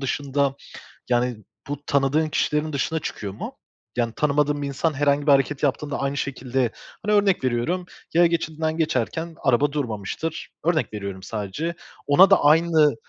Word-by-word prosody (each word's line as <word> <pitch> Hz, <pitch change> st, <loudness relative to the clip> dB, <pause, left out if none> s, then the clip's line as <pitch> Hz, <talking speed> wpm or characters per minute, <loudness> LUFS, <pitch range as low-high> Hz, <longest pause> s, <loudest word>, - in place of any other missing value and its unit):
dışında, 140 Hz, 0 st, 0 dB, 0.6 s
yani, 120 Hz, -1 st, +1 dB, 0.3 s
bu 145 Hz, 0 st, -5 dB
tanıdığın 140 Hz, +3 st, +2 dB
kişilerin 150 Hz, 0 st, 0 dB
dışına 160 Hz, +3 st, -1 dB
çıkıyor 100 Hz, -8 st, -5 dB
mu? -, -, -7 dB, 0.4 s
Yani, 115 Hz, -2 st, 0 dB
tanımadığın 145 Hz, 0 st, +1 dB
bir 140 Hz, -, -2 dB
insan 150 Hz, +3 st, 0 dB
herhangi 145 Hz, +1 st, +1 dB
bir 145 Hz, -, +7 dB
hareket 140 Hz, +1 st, +2 dB
yaptığında 145 Hz, +1 st, 0 dB
aynı 140 Hz, +1 st, -1 dB
şekilde, 130 Hz, -3 st, -1 dB, 0.3 s
hani, 210 Hz, -, +3 dB
örnek 200 Hz, -7 st, +3 dB
veriyorum, 130 Hz, +9 st, 0 dB, 0.3 s
yaya 170 Hz, +1 st, +6 dB
geçidinden 160 Hz, -1 st, -1 dB
geçerken 160 Hz, +2 st, -1 dB
araba 135 Hz, +2 st, +3 dB
durmamıştır, 140 Hz, +3 st, -4 dB
örnek 160 Hz, -8 st, +1 dB
veriyorum 100 Hz, -2 st, -5 dB
sadece. 110 Hz, -, -4 dB, 0.3 s
Ona 180 Hz, +8 st, +7 dB
da 195 Hz, -, +5 dB
aynı 155 Hz, -1 st, +5 dB
145 Hz, 145 wpm, -24 LUFS, 130-160 Hz, 0.6 s, bir